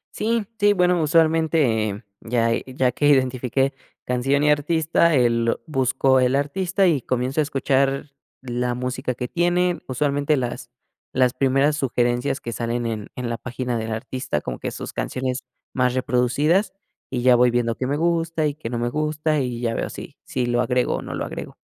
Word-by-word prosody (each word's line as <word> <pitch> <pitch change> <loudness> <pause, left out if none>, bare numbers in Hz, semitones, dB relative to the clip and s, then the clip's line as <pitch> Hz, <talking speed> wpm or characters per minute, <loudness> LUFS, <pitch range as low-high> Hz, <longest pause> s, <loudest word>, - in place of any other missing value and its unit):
Sí, 225 0 0
sí, 205 0 +4
bueno, 180 -2 +2
usualmente, 155 - +2 0.2
ya 115 0 0 0.2
ya 130 -1 +1
que 145 +4 0
identifiqué 130 0 +2 0.3
canción 135 +3 +1
y 150 - +4
artista, 160 +2 +2
el 115 -3 +2
buscó 130 -2 +2
el 130 +1 +2
artista 180 +7 +1
y 145 -7 +1
comienzo 130 +4 -1
a - - +4
escuchar 135 0 0 0.3
la 125 -1 -2
música 125 +1 -3
que 125 0 -4
tiene, 175 +1 +1
usualmente 145 +3 +1
las 120 -2 -4 0.4
las 125 -1 +3
primeras 135 +3 +2
sugerencias 125 0 0
que 115 - -6
salen 120 +2 -2
en 110 -3 -4
en 125 -1 -3
la 115 - -1
página 125 -1 -3
del 110 0 -4
artista, 115 - -3
como 65 -4 -5
que - - -4
sus - - -7
canciones 130 0 -3 0.3
más 125 -1 +1
reproducidas, 130 - +1 0.4
y 125 -2 -2
ya 125 0 +6
voy 125 0 +4
viendo 120 -1 0
qué 130 - -2
me 140 +2 0
gusta 165 -1 0
y 145 - -1
qué 150 -6 -7
no 120 - -2
me 120 +1 0
gusta, 155 +1 0
y 125 -2 -3
ya 115 -1 -1
veo - - -2
si - - -9
si 125 -2 -2
lo 120 0 +1
agrego 125 -1 +1
o - - -5
no - - -6
lo - - -2
agrego. - - -7
130 Hz, 180 wpm, -22 LUFS, 120-150 Hz, 0.4 s, ya